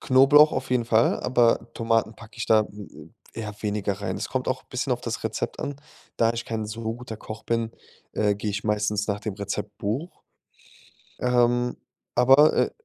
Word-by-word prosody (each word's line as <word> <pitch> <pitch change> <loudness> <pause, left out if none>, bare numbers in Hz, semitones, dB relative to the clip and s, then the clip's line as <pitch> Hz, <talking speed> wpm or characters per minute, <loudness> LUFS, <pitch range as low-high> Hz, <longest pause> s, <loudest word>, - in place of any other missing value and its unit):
Knoblauch 135 +4 +6
auf 130 0 -3
jeden 125 -2 +2
Fall, 115 0 +3
aber 120 -2 +2
Tomaten 115 -1 +1
packe 115 +1 -15
ich - - -3
da, 110 -1 +5
hm, 105 0 -12 0.2
äh, 115 - -5
eher 105 -1 -5
weniger 105 -1 -1
rein. 100 - -3
Es - - -4
kommt - - -2
auch - - -1
bisschen - - -2
auf - - -2
das - - -4
Rezept - - -3
an. 145 - -4 0.4
Da 115 0 +3
ich 115 - -4
kein 110 -2 -3
so 110 +2 -6
guter 120 -3 -8
Koch 110 0 -9
bin, 115 -1 -1 0.4
äh, 105 -1 +1
gehe 105 +1 -3
ich 105 +2 -3
meistens 105 -1 0
nach 100 -1 -2
dem 105 -1 -4
Rezeptbuch. 105 - -4 1.0
Ähm, 120 0 +2 0.4
aber, 135 +5 +6
äh - - +2
115 Hz, 180 wpm, -25 LUFS, 105-125 Hz, 1.0 s, Knoblauch